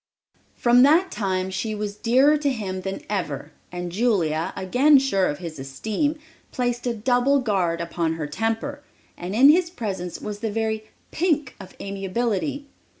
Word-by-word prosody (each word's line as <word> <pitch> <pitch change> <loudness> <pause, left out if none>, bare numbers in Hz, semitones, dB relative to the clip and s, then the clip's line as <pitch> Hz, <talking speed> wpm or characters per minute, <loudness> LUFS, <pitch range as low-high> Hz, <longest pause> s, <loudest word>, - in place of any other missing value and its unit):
From 240 +1 +4
that 325 +8 +5
time 190 -3 -1
she 215 +3 -3
was 205 -1 -4
dearer 260 +7 +4
to 295 -1 0
him 195 -7 -3
than 195 +1 -5
ever 160 -7 -3 0.2
and 175 -1 -5
Julia, 175 -7 +1
again 265 +10 +4
sure 200 -9 +2
of 145 - -2
his 165 -4 -7
esteem, 215 - -2 0.3
placed 245 -1 -2
a 240 - +1
double 245 +5 +2
guard 190 -9 0
upon 170 -1 -1
her 160 -2 -4
temper, 225 - -2 0.3
and 180 +3 -5
in 265 +5 +7
his 340 +2 +4
presence 195 - -5
was 210 -1 -6
the 225 0 -2
very 220 0 -2 0.3
"pink" 305 -6 0
of 195 - -12
amiability! 210 +8 -2
215 Hz, 155 wpm, -24 LUFS, 185-255 Hz, 0.3 s, in